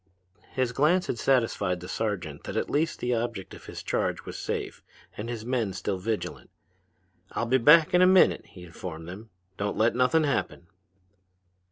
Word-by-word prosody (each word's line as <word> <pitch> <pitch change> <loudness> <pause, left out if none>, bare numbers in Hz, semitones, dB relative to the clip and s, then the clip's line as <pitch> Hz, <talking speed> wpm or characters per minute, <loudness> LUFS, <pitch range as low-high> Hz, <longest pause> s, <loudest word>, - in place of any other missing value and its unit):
His 130 -2 0
glance 155 +8 +3
had 115 - -3
satisfied 110 -9 +1
the 90 - -9
sergeant 95 -10 -3
that - - -4
at - - -1
least 160 +3 +1
the 125 0 -1
object 115 -4 -3
of - - -12
his - - -8
charge - - -1
was - - -7
safe - - -4 0.3
and 110 +3 -5
his 115 -2 -5
men 120 -6 -1
still 95 0 -3
vigilant. 110 +3 -4 0.8
"I'll 115 - -1
be 130 +3 +3
back 150 +5 +6
in 180 - +5
a 185 - +7
minute," 185 0 +4
he 90 - -13
informed 80 -1 -8
them. 105 +6 -9 0.3
"Don't 100 0 -2
let 110 +2 +3
nothin' 125 +6 +3
happen." 140 - -1
115 Hz, 175 wpm, -27 LUFS, 95-130 Hz, 0.8 s, a